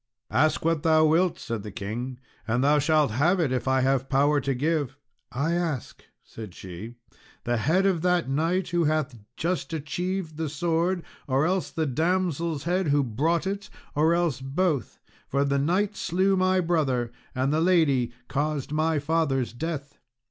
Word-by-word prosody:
"Ask 155 +7 +2
what 165 -2 +2
thou 155 0 +4
wilt," 165 +3 +3
said 115 -2 -4
the 105 - -7
king, 115 +6 -5 0.3
"and 120 +3 +1
thou 145 +1 +4
shalt 150 -3 +3
have 165 - +2
it, 155 -6 +1
if 130 0 -1
I 130 0 +3
have 135 0 +1
power 145 +2 +3
to 135 0 -1
give." 145 -1 -1 0.3
"I 155 +6 0
ask," 165 -7 -3 0.2
said 110 -5 -10
she, 95 +6 -8 0.5
"the 120 0 0
head 160 - +2
of 185 -4 +2
that 180 -2 +2
knight 165 +7 0
who 175 -2 +1
hath 150 -4 0 0.2
just 175 0 -2
achieved 165 +2 -3
the 160 -2 -2
sword, 170 +4 0 0.2
or 135 +2 +2
else 185 +2 0
the 160 - -1
damsel's 165 +1 0
head 180 +1 0
who 145 0 +3
brought 150 - 0
it, 200 +1 -3 0.2
or 160 +3 +3
else 170 -7 0
both; 145 0 -1 0.3
for 140 +1 +1
the 140 0 +1
knight 190 +8 +1
slew 190 +2 +1
my 185 0 +2
brother, 140 -9 0 0.2
and 130 +3 +1
the 155 - +2
lady 155 -9 +3 0.2
caused 145 -1 -2
my 155 +1 +1
father's 145 -5 0
death." 145 +1 -5
155 Hz, 170 wpm, -26 LUFS, 135-170 Hz, 0.5 s, thou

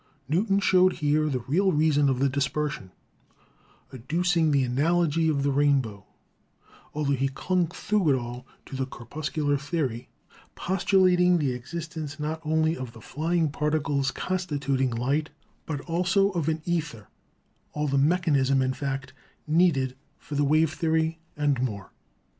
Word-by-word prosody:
Newton 195 +6 +2
showed 185 -1 +4
here 155 0 +1
the 130 -3 -2
real 190 +7 +2
reason 150 -2 +3
of 130 - +1
the 135 +2 +2
dispersion, 140 -5 -2 1.0
adducing 165 +6 +1
the 140 -2 +3
analogy 160 +5 +1
of 140 -3 0
the 140 - +1
rainbow, 135 -8 +1 0.9
altho 150 -2 0
he 135 0 +1
clung 175 +6 0
through 190 +1 0
it 135 - +4
all 120 +2 -8 0.2
to - - -8
the 130 0 -2
corpuscular 145 +3 -2
theory,, 135 -5 -3 0.5
postulating 180 -1 +3
the 145 -5 0
existence 155 +3 -6
not 155 +2 -3
only 160 +1 +1
of 130 -5 -7
the 115 - -12
flying 160 +5 -1
particles 145 -2 0
constituting 140 -8 -1
light, 135 +7 -1 0.4
but 145 -3 -3
also 180 +4 +1
of 165 -4 -1
an 160 0 -2
ether 150 - -3 0.3
— - - -42
all 150 0 -1
the 140 0 +1
mechanism, 140 -4 +2
in 130 0 +1
fact, 135 -1 -4 0.3
needed 150 -6 +2 0.2
for - - -10
the 145 0 +1
wave 155 +2 +3
theory, 160 -1 0 0.2
and 145 -4 +1
more. 105 -7 -4
150 Hz, 145 wpm, -26 LUFS, 135-165 Hz, 1.0 s, showed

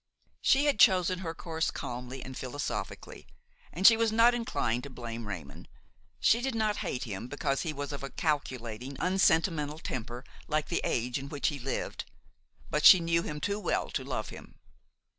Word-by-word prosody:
She 275 +2 +4
had 290 - +2
chosen 185 -3 +5
her 165 -3 -5
course 160 -1 -2
calmly 125 +2 -6
and 130 0 -8
philosophically, 130 +4 -5 0.4
and 190 - -3
she 225 - +10
was 225 -1 +1
not 230 +2 +5
inclined 125 - -1
to 140 - -8
blame 115 -3 -7
Raymon; 80 -9 -8 0.5
she 235 - +4
did 260 -1 -2
not 215 -2 +1
hate 125 - -3
him 110 -1 -5
because 140 0 -1
he 160 - -2
was 145 -1 -5
of 140 - -6
a 135 - -5
calculating, 130 -5 -3
unsentimental 160 -5 +2
temper 120 -5 -5 0.2
like 155 0 -1
the 170 - 0
age 120 +2 -1
in 135 +1 -8
which 145 -1 0
he 145 -2 -5
lived; 135 +2 -4 0.7
but 150 - 0
she 185 - +10
knew 165 0 +1
him 150 -2 -5
too 200 +6 -1
well - - -1
to - - -2
love - - -4
him. - - -12
150 Hz, 180 wpm, -30 LUFS, 125-185 Hz, 0.7 s, she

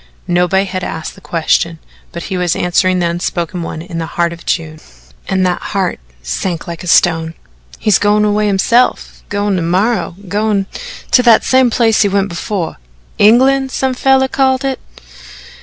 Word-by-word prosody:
Nobody 180 +2 +2
had 185 -1 -4
asked 160 -2 -5
the - - -17
question, 165 0 0 0.3
but 170 - -6
he 190 - -4
was 180 -2 0
answering 185 +1 +1
the 175 - 0
unspoken 175 +1 -2
one 160 -1 -6
in 170 -2 -6
the 165 - -3
heart 170 0 -1
of 170 - -14
June, 155 -2 -2 0.5
and 190 -1 +1
that 180 -1 -1
heart 195 -3 -2 0.2
sank 160 - -3
like 170 0 -6
a - - -7
stone. 165 -1 +2 0.4
"He's 210 -4 +2
goin' 210 +1 +2
away 210 0 +1
hisself 230 +5 +1
goin' 205 -1 0
ter - - -1
morrow 180 +1 0
goin' 205 0 0 0.5
to 250 - +6
that 235 -3 +5
same 260 -1 +3
place 225 -2 +2
he 205 - +3
went 200 0 0
before 170 0 -4 0.4
England, 265 +5 +4
some 265 0 -1
feller 265 +1 +3
called 265 0 +1
it." 265 -1 -2
190 Hz, 170 wpm, -15 LUFS, 170-220 Hz, 0.5 s, to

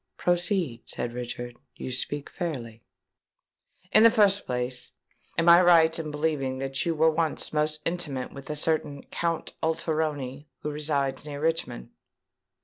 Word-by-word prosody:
"Proceed," 175 - 0
said 120 - -3
Richard: 120 0 -6 0.2
"you 130 - -6
speak 140 +3 -3
fairly." 120 -10 -5 1.1
"In 215 - +7
the 230 - +9
first 205 -3 +3
place, 125 0 -2 0.4
am 165 - +2
I 170 +1 +9
right 165 -2 +5
in 155 -2 -4
believing 150 -3 -1
that 135 +3 -2
you 165 - +1
were 160 +1 +4
once 160 -1 -1
most 150 0 0
intimate 155 -7 -2
with 140 +1 -10
a 150 - -2
certain 150 -2 0
Count 170 -1 -2
Alteroni 155 -4 -1 0.2
who 150 - -2
resides 145 -3 -1
near 145 -1 -5
Richmond?" 155 - -2
150 Hz, 140 wpm, -27 LUFS, 135-165 Hz, 1.1 s, the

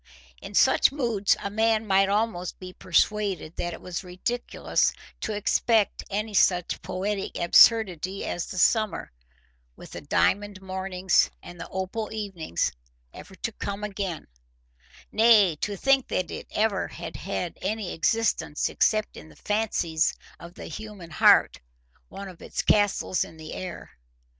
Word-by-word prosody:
In - - -9
such - - +5
moods 235 -8 +1
a 200 - -3
man 220 +1 +2
might 195 -1 +3
almost 205 -4 -1
be 185 -1 -9
persuaded 190 -2 0
that 175 - -2
it 165 - -9
was 180 +1 -5
ridiculous 185 +7 -1 0.3
to 215 - -3
expect 210 +1 +1
any 210 +2 -3
such 180 -3 +2
poetic 195 +2 -3
absurdity 190 0 +4
as 175 - -3
the - - -7
summer, 215 +2 +2 0.6
with - - -12
its - - -9
diamond 205 -1 +1
mornings 190 -1 +1
and 175 -1 -10
its - - -8
opal 190 +4 -4
evenings, 195 - -2 0.4
ever 190 - -12
to 230 - -4
come 200 -1 -5
again; 195 -5 -4 0.9
nay, 215 -6 +5
to 205 +5 -3
think 270 +4 +3
that 180 -3 -2
it - - -7
ever 210 -2 0
had 165 - -8
had 180 -2 -4
any 215 -4 -2
existence 165 -4 0
except 215 -1 +1
in 80 - -11
the 75 - -17
fancies 200 -6 0 0.2
of 170 +1 -12
the - - -9
human 210 -6 -9
heart—one - - +1
of 180 -3 -12
its - - -4
castles 205 -3 +2
in 160 - -12
the 155 -1 -8
air. 185 - -7
195 Hz, 145 wpm, -26 LUFS, 175-215 Hz, 0.9 s, such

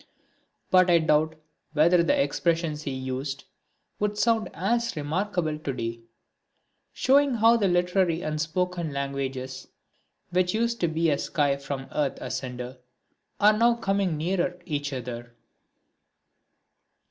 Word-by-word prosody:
But 185 0 +5
I 170 - +6
doubt 155 0 +2 0.4
whether 170 +3 +5
the 170 - +2
expressions 155 +2 0
he 150 - -4
used 130 +1 -4 0.6
would 210 0 -1
sound 225 -1 +2
as 235 +6 -1
remarkable 160 +1 -1
to 140 -3 -3
day; 115 -1 -4 0.9
showing 275 0 +3
how 230 +1 +5
the 210 -4 +2
literary 175 -1 +1
and 155 0 -2
spoken 175 0 -2
languages, 135 -1 -4 0.6
which 180 +2 +1
used 235 +1 0
to 170 - +2
be 160 0 +1
as 140 - -1
sky 145 -2 +1
from 135 -1 -5
earth 145 -3 -1
asunder, 125 0 -5 0.6
are 210 +1 +6
now 235 +2 +4
coming 195 -7 0
nearer 175 +2 -1
each 145 -3 -3
other. 120 -2 -6
160 Hz, 125 wpm, -26 LUFS, 140-185 Hz, 0.9 s, I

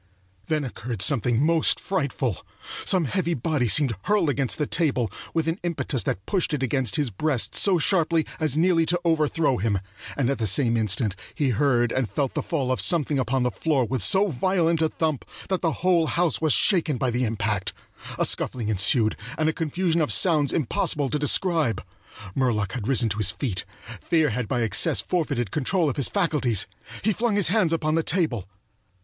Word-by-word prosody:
Then 155 -2 0
occurred 120 -4 -4
something 125 +1 +2
most 165 0 +3
frightful. 140 - -2 0.4
Some 185 -4 +3
heavy 170 +2 -1
body 135 -1 -1
seemed 135 +1 +3
hurled 205 -8 +2
against 135 -2 -1
the 150 - -1
table 135 - 0 0.2
with 165 -1 -1
an 165 +4 -1
impetus 165 -7 -2
that 95 - -4
pushed 180 -5 -1
it 135 - -4
against 130 0 0
his 145 -6 0
breast 135 +4 0
so 195 -3 +4
sharply 165 -2 +1
as 155 -3 0
nearly 165 -1 +2
to 175 +1 +2
overthrow 155 -3 +1
him, 100 0 0 0.4
and 135 -2 +1
at 135 - -3
the 110 - 0
same 115 +4 +2
instant 110 -1 0 0.2
he 145 -3 0
heard 120 -1 +1
and 130 -4 -1
felt 130 +7 -2
the - - -2
fall 135 -6 -2
of 130 - +1
something 150 -5 +2
upon 130 0 0
the 125 - 0
floor 145 -4 0
with 130 0 -3
so 190 - +3
violent 170 +2 0
a 160 - +2
thump 155 -5 -2 0.3
that 190 -1 -1
the 165 - +1
whole 170 -3 +3
house 170 -3 0
was 155 -1 +2
shaken 165 -7 +4
by 125 0 -1
the 125 +2 -1
impact. 105 -3 -2 0.5
A - - +2
scuffling 115 -4 -1
ensued, 110 +2 +3 0.2
and 155 0 +1
a - - -1
confusion 165 +2 -1
of 150 - 0
sounds 155 -6 +3
impossible 145 -1 -1
to 150 - -1
describe. 150 - +1 0.5
Murlock 110 -6 0
had 105 +1 -5
risen 125 -4 +1
to 105 +1 -4
his 105 -3 +3
feet. 100 -3 -3 0.4
Fear 160 -4 +1
had 120 0 -3
by 120 +2 -1
excess 115 - +2
forfeited 145 - -2
control 155 +2 0
of - - -9
his 140 - +2
faculties. 140 - +1 0.4
He 215 +1 +2
flung 230 +1 -1
his 200 -5 +3
hands 190 -4 +2
upon 155 -2 0
the 165 - +2
table. 155 - -1
145 Hz, 190 wpm, -24 LUFS, 120-165 Hz, 0.5 s, so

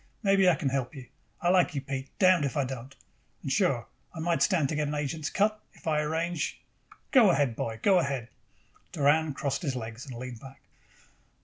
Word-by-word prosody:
Maybe 195 -2 +5
I 175 - +4
can 150 -6 -1
help 135 +1 -2
you. 130 -2 -9 0.4
I 175 - +2
like 180 -4 +3
you, 140 - -1
Pete, 135 0 -5
damn 185 -4 +5
if 140 +2 -2
I 140 - +2
don't. 130 +1 -7 0.5
And, - - -3
sure, - - +1 0.3
I - - -6
might 170 +1 0
stand 170 -8 +3
to - - -2
get 150 0 0
an 150 - -2
agent's 150 +1 -2
cut, 215 +1 +1
if - - -20
I 155 -2 +2
arrange 160 +2 -2 0.5
Go 245 -8 +7
ahead, 140 -8 +2
boy, 110 0 -4
go 195 -3 +5
ahead." 135 -6 -2 0.6
Doran 150 0 +2
crossed 140 +1 -2
his 140 -7 -2
legs 115 +2 -6
and 130 - -7
leaned 125 -1 -7
back. 135 +1 -13
145 Hz, 200 wpm, -28 LUFS, 135-170 Hz, 0.6 s, Go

